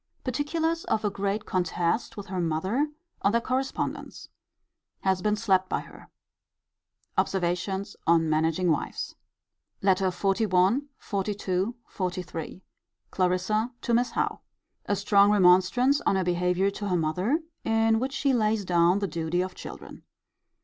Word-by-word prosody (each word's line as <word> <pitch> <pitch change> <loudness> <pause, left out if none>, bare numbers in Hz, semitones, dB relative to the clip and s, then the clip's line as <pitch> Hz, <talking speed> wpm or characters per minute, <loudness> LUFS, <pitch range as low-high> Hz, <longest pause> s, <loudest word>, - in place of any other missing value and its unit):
Particulars 320 +6 -1
of 215 0 0
a 205 - +1
great 200 +2 -2
contest 180 +4 -1
with 205 - -6
her 185 -2 -4
mother, 185 - 0 0.3
on 200 - +2
their 235 - +4
correspondence. 260 +3 -3 0.7
Has 190 -1 +1
been 210 +1 +2
slapt 190 -4 +1
by - - -1
her. - - -14 1.1
Observations 190 +2 -1
on 165 -1 +4
managing 160 +3 +2
wives. 155 - -2 0.7
LETTER 190 -1 +3
XLI. 195 +6 +2
XLII. 200 +1 -2 0.2
XLIII. 180 -2 -4 0.5
Clarissa 185 +6 0
to 235 - -1
Miss 245 +2 +2
Howe. - - 0 0.5
A 205 - +2
strong 200 0 +4
remonstrance 205 +8 +4
on - - +3
her 190 - +1
behaviour 180 +2 +1
to 205 +1 -5
her 180 - +2
mother; 180 - +1 0.3
in 225 0 +2
which 265 +3 -2
she 280 -2 +1
lays 215 -3 +1
down 175 +1 +3
the 200 -1 -1
duty 170 0 -1
of 185 0 -3
children. - - -10
195 Hz, 135 wpm, -27 LUFS, 180-225 Hz, 1.1 s, their